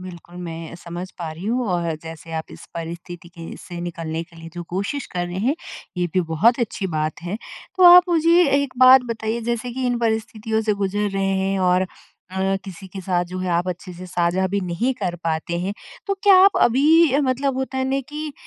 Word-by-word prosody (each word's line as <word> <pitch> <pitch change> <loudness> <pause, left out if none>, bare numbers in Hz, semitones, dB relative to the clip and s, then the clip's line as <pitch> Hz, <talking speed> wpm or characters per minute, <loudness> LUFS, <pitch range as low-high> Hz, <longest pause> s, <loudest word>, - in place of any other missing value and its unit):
बिल्कुल 175 -1 -11
मैं 165 0 -7
समझ 175 +2 -7
पा 165 -2 -4
रही 165 +4 -9
हूँ 245 +2 0
और 170 -2 0
जैसे 165 0 -9
आप 160 0 -4
इस - - -11
परिस्थिति 170 +1 -7
के 170 -1 -10
से 175 -1 -8
निकलने 165 -2 -4
के 165 - -20
लिए 165 0 -10
जो 175 - -5
कोशिश 200 +10 -2
कर 175 0 -1
रहे 175 +1 -5
हैं 275 - +3 0.4
ये 180 0 +1
भी 185 - +4
बहुत 215 - +3
अच्छी 215 -4 -2
बात 155 +2 -2
है। 180 +4 -3 0.4
तो 370 - +2
आप 360 +1 +10
मुझे 340 +1 +5 0.2
एक 255 -2 -5
बात 255 0 +8
बताइए 225 0 -2
जैसे 235 +1 -2
कि 255 +1 -2
इन 245 -1 0
परिस्थितियों 220 -1 -1
से 210 -1 +1
गुजर 205 +1 -1
रहे 195 0 -1
हैं 195 0 0
और 185 +1 +2 0.4
अ, 190 +1 0
किसी 190 0 -9
के 190 +1 -7
साथ 180 -1 0
जो 180 +1 -7
है 185 0 -2
आप 175 +2 +1
अच्छे 180 +1 -5
से 185 - -8
साझा 180 +1 +1
भी 200 - +2
नहीं 185 +8 -1
कर 190 -7 -3
पाते 165 +1 -1
हैं 185 +3 -2 0.3
तो 395 - 0
क्या 405 -1 +7
आप 395 - +5
अभी 295 +5 +5
अ, 280 - +3
मतलब 265 0 0
होता 265 0 -3
है 260 - +1
ना 270 +1 +1
कि 300 0 -5
190 Hz, 220 wpm, -22 LUFS, 175-245 Hz, 0.4 s, आप